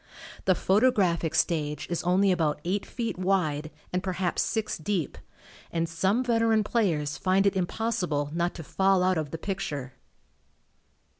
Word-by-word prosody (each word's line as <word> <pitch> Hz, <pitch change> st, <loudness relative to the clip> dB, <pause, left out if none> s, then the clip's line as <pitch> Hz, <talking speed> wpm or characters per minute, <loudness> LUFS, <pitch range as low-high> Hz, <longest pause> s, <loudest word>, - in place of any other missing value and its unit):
The 185 Hz, -, +4 dB
photographic 190 Hz, -7 st, +2 dB
stage 150 Hz, -3 st, 0 dB
is 175 Hz, -, -2 dB
only 190 Hz, +3 st, +3 dB
about 160 Hz, -5 st, +1 dB
eight 195 Hz, +3 st, -1 dB
feet 230 Hz, -6 st, -4 dB
wide 160 Hz, -6 st, 0 dB, 0.2 s
and 180 Hz, -, +1 dB
perhaps 185 Hz, -1 st, -1 dB
six 220 Hz, -5 st, -2 dB
deep, 170 Hz, -1 st, -2 dB, 0.5 s
and 165 Hz, 0 st, -1 dB
some 190 Hz, +9 st, +1 dB
veteran 225 Hz, -3 st, +2 dB
players 155 Hz, -, 0 dB
find 190 Hz, +1 st, +2 dB
it 200 Hz, -, +3 dB
impossible 180 Hz, -6 st, -1 dB
not 170 Hz, +1 st, -1 dB
to 165 Hz, -, -7 dB
"fall 190 Hz, +3 st, +2 dB
out 185 Hz, -2 st, +2 dB
of 155 Hz, -2 st, -3 dB
the 165 Hz, -, -5 dB
picture." 150 Hz, -8 st, -4 dB
180 Hz, 145 wpm, -27 LUFS, 160-200 Hz, 0.5 s, The